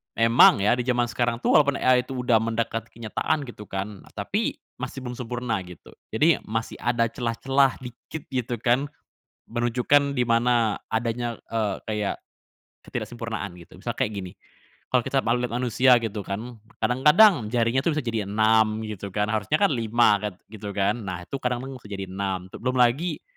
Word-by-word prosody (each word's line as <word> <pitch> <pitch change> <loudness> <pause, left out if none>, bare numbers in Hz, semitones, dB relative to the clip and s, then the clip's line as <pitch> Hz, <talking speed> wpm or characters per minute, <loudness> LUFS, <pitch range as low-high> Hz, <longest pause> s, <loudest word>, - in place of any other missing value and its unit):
emang 115 -3 +6
ya 105 +4 +4
di 125 0 -3
jaman 120 -1 +2
sekarang 120 -1 0
tuh - - +3
walaupun 145 -2 +5
AI 125 -1 +4
itu, 130 -2 -4
udah 115 -2 +4
mendekat 115 0 -2
kenyataan 115 +6 -2
gitu 115 -5 -10
kan, 100 +1 -5
tapi - - -2 0.2
masih 135 - -6
belum 125 -1 -5
sempurna 120 -3 -2
gitu. 90 -2 -13 0.2
Jadi, 155 +8 +4
masih 110 +1 -3
ada 120 -1 +1
celah-celah 130 +2 +1
dikit 125 +5 -8
gitu 125 -2 -2
kan, 125 +4 +2 0.6
menunjukkan 125 +4 +2
di 125 - +3
mana 115 -2 +2
adanya, 115 +1 -1
eee, 110 -3 -1
kayak, 105 -2 -2 0.7
ketidaksempurnaan, 115 -6 -5
gitu. 85 -1 -15
Misalnya - - -4
kayak 105 - 0
gini, 95 -3 -6 0.6
kalau - - +4
kita - - +1
mau 115 - 0
lihat 120 -1 -2
manusia 125 +1 +4
gitu 110 -1 -3
kan, 110 +4 -6 0.2
kadang-kadang 150 - +5
jarinya 115 +2 +1
tuh 155 +3 0
bisa 150 - -1
jadi 115 -4 -2
6 110 +1 +3
gitu 105 -2 -6
kan, 105 +2 -1
harusnya 110 +5 0
kan 200 0 +3
5 115 -3 +3
kan 105 -1 -4 0.2
gitu 105 -2 -7
kan, 105 +3 +1
nah 90 -4 -5
itu 135 - -6
kadang 125 -1 -2
bisa 130 -5 -9
jadi 95 -2 -6
6 95 -1 -3
tuh. - - -9
Belum 125 +2 -1
lagi, 130 +8 +2
115 Hz, 170 wpm, -25 LUFS, 105-125 Hz, 0.7 s, emang